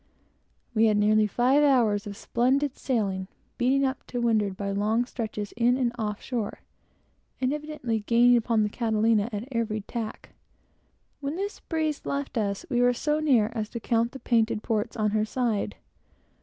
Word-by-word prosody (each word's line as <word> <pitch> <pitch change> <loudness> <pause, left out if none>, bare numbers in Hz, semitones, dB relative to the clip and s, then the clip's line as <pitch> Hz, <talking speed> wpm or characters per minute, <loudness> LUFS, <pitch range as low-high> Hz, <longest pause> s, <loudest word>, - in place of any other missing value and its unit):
We 225 0 +4
had 210 -1 +3
nearly 215 +1 +4
five 255 +7 +3
hours 225 -7 +3
of 200 -1 -7
fine 250 +4 +1
sailing, 200 -9 -1 0.3
beating 265 +3 +3
up 265 0 -2
to 245 - -3
windward, 215 -5 +1
by 200 -1 -3
long 215 +4 +1
stretches 215 -4 -5
in 240 +2 +2
and 250 -3 +1
off 210 -3 -3
shore, 230 -5 -3 0.8
and 260 +1 +1
evidently 300 -7 -3
gaining 235 +3 +4
upon 230 -2 +2
the 210 - 0
Catalina 220 -1 +1
at 210 +3 -5
every 225 -3 -1
tack. 220 +1 -6 0.9
When 285 +1 -3
this 400 +3 -4
breeze 315 -3 -2
left 280 -1 -3
us, 200 -3 -1
we 245 -3 +1
were 245 0 +4
so 300 +5 0
near 245 -8 +3
as 215 -3 -3
to 235 - -5
count 230 +1 0
the 270 - -8
painted 225 -3 +1
ports 225 +1 -1
on 215 -1 +1
her 215 0 +1
side. 225 -1 -1
230 Hz, 170 wpm, -27 LUFS, 215-255 Hz, 0.9 s, We